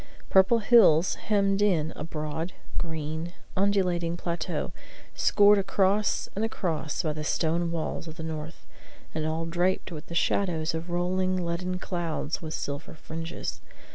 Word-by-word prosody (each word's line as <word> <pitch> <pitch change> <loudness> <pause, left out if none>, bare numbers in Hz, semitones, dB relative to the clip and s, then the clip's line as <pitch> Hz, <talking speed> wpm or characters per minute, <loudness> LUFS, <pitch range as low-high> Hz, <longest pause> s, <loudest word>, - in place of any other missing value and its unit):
Purple 190 +5 +6
hills 195 -7 +6
hemmed 200 -1 +1
in 165 -7 +2
a - - -5
broad, 160 +2 -4 0.3
green, 160 +1 -3 0.2
undulating 180 -4 +1
plateau, 170 -2 -3 0.4
scored 205 0 +5
across 195 +1 +2
and 210 - -1
across 170 -8 -2
by 155 -2 0
the 155 0 -5
stone 170 +2 +1
walls 165 0 -3
of 160 - -7
the 160 - -6
north, 160 0 -6 0.5
and 155 -1 -1
all 160 +1 -1
dappled 175 +3 0
with 155 -1 -7
the 170 - -7
shadows 165 -4 +1
of 165 +2 -4
rolling 185 +1 0
leaden 180 +2 -2
clouds 175 -4 -3
with 155 -1 -4
silver 140 +3 -5
fringes. 165 +2 -6
170 Hz, 140 wpm, -28 LUFS, 160-190 Hz, 0.5 s, Purple